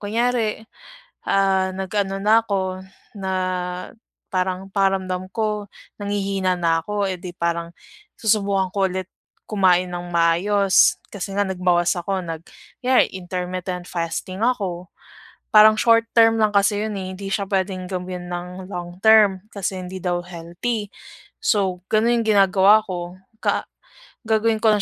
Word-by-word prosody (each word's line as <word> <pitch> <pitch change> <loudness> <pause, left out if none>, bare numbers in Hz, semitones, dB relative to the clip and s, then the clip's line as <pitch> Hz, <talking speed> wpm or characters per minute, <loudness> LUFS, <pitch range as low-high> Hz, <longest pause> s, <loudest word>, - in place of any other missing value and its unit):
kunyari, 225 0 -1 0.6
ah, 190 -1 +2
nag-ano 195 +1 -2
na 215 +3 +4
ako, 190 -3 -2 0.4
na 190 -1 -3 1.0
parang 185 0 -1
pakiramdam 190 -2 0
ko, 210 -1 -2 0.3
nanghihina 195 -2 -1
na 165 -1 +2
ako, 205 +2 -2
eh, 185 -1 -3
di 185 - -6
parang 170 0 -2 0.5
susubukan 200 -4 +1
ko 195 -1 +2
ulit 185 0 -4 0.4
kumain 185 -3 +3
nang 175 0 -5
maayos. 190 +4 +4
Kasi 200 -1 -5
nga 205 - +2
nagbawas 180 -2 +1
ako 190 +2 -2
nag 165 0 -5 0.4
yeah, 255 +1 +5
intermittent 180 0 -5
fasting 180 +3 -4
ako, 190 -8 -1 0.7
parang 215 0 +8
short 230 0 +4
term 225 0 +6
lang 215 - +4
kasi 205 +1 +2
'yon, 215 -2 -4
eh, 190 -1 -5
hindi 195 +1 -7
siya 200 0 -1
pwedeng 190 -1 -1
gawin 180 -1 -5
nang 180 +1 -6
long 175 -1 -6
term 210 -4 +6
kasi 195 -1 -3
hindi 185 +1 -7
daw 175 -1 -1
healthy. 180 +6 -4 0.5
So 195 - +1
gano'n 230 +2 +3
yung 225 - -5
ginagawa 195 +2 +5
ko, 175 -2 -5 0.3
ka - - 0 0.6
gagawin 220 0 +2
ko 220 - +5
lang 210 - +1
190 Hz, 140 wpm, -22 LUFS, 180-210 Hz, 1.0 s, parang